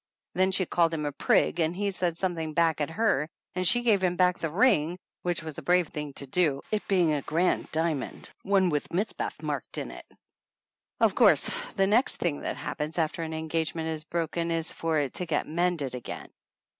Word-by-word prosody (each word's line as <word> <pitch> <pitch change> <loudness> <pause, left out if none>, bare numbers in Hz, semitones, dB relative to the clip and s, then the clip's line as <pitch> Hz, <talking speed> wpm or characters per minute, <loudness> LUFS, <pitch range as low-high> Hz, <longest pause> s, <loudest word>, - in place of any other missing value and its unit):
Then 185 0 +3
she 190 0 +2
called 165 -1 +2
him 150 -1 -3
a 145 - -1
prig 145 - +2
and 165 +1 +1
he 200 +1 -1
said 175 -3 0
something 165 -4 -2
back 165 -2 +2
at 150 - 0
her 165 -5 +1 0.2
and 185 0 +1
she 240 +5 +4
gave 210 -5 +3
him 180 -1 +2
back 180 0 +3
the 165 - -2
ring, 175 - +3 0.2
which 175 -2 -2
was 155 -2 -6
a - - -8
brave 180 -2 +2
thing 150 -1 -5
to 140 - -6
do, 140 -1 +1
it 215 -1 -1
being 175 -5 +3
a 145 - 0
grand 170 +6 0
dia 160 +1 +1
mond 135 -3 -6
one 195 -2 +3
with 150 -3 -1
Mizpath 195 +6 -2
marked - - -3
in - - -4
it. - - -11 0.9
Of - - +4
course - - +4 0.2
the 195 - +3
next 220 +6 +3
thing 160 -5 -1
that - - -4
happens 155 +3 -4
after 165 +1 0
an 160 -1 -4
engagement 160 0 -2
is 155 -1 -4
broken 170 +1 -2
is 165 -1 -1
for 165 -1 -1
it 140 -4 0
to 180 - -1
get 150 -3 0
mended 165 -5 0
again. 125 - -7
165 Hz, 205 wpm, -28 LUFS, 155-180 Hz, 0.9 s, she